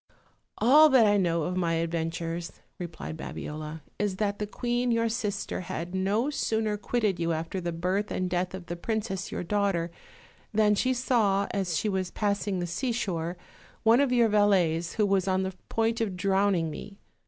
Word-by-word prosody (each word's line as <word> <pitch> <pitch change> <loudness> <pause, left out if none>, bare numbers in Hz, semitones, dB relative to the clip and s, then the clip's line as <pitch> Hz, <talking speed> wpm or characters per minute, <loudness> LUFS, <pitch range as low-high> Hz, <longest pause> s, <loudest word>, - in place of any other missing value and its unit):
"All 295 +7 +7
that 260 -5 +6
I 205 0 +4
know 170 -4 +1
of 180 +3 -2
my 170 -2 +1
adventures," 165 0 -2 0.3
replied 160 -2 -6
Babiola, 155 0 -6 0.2
"is 205 -2 0
that 205 0 -1
the 210 - -2
queen 240 +3 -1
your 230 -1 +2
sister 210 -4 -2
had 175 0 -5
no 205 +9 +1
sooner 220 -6 0
quitted 210 -2 -1
you 170 0 +1
after 165 +4 -3
the 170 0 -2
birth 185 +5 -1
and 185 - -1
death 180 +1 -1
of 190 -2 -8
the 175 - -4
princess 195 -1 -3
your - - -3
daughter, 185 -3 0 0.6
than 215 -1 +4
she 255 +5 +1 0.2
;aw, 200 -5 +3
as 185 -5 -1
she 215 - 0
was 190 -2 -1
passing 200 -1 -1
the 175 - -1
seashore, 175 -4 -2 0.5
one 230 +2 +6
of 280 -3 +2
your 240 -2 +4
valets 185 -6 +2
who 210 - +2
was 195 -1 +1
on 190 0 +2
the 190 0 -3 0.2
point 225 0 0
of 200 -5 -1
drowning 190 -3 +2
me. 200 +6 -9
195 Hz, 175 wpm, -28 LUFS, 175-215 Hz, 0.6 s, All